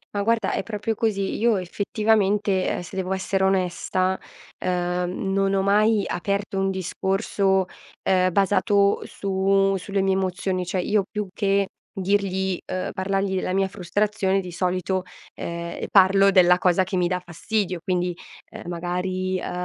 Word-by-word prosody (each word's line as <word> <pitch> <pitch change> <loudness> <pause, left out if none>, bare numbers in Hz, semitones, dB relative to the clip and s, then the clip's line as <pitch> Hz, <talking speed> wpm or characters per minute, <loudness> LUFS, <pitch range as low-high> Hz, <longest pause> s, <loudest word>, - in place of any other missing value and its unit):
Ma 200 - 0
guarda, 225 -1 +1
è - - -1
proprio 220 +1 -3
così. 200 -3 -1
Io 230 -1 +3
effettivamente, 205 +1 +1
ehm, - - -1
se 175 +2 -10
devo 190 0 -1
essere 190 0 -1
onesta, 185 0 0 0.5
uhm, 180 +1 -1
non 195 0 +1
ho 195 - +2
mai 210 +2 +3
aperto 200 +2 -2
un 195 0 +1
discorso, 190 +1 0 0.4
ehm, 185 -1 +2
basato 200 +1 +3
su 195 0 +1
sulle 195 +1 -2
mie 190 0 +2
emozioni, 185 -1 -1
cioè 180 +2 -2
io 210 +2 +1
più 210 -1 -3
che 200 -1 +1 0.2
dirgli 190 -1 0
uhm, 185 - -2
parlargli 195 0 -1
la 185 - -2
mia 195 0 +2
frustrazione 195 +1 0
di 180 -2 -6
solito, 185 +1 -1 0.3
ehm, 170 0 -5
e - - -3
parlo 195 0 +6
della 180 -2 +6
cosa 180 0 +3
che 190 - -4
mi 180 -1 +2
dà 180 0 -1
fastidio: 180 +2 -2
quindi, 180 -2 -1 0.4
ehm, - - -9
magari, 185 +2 -2
uhm, - - -3
190 Hz, 155 wpm, -24 LUFS, 185-200 Hz, 0.5 s, parlo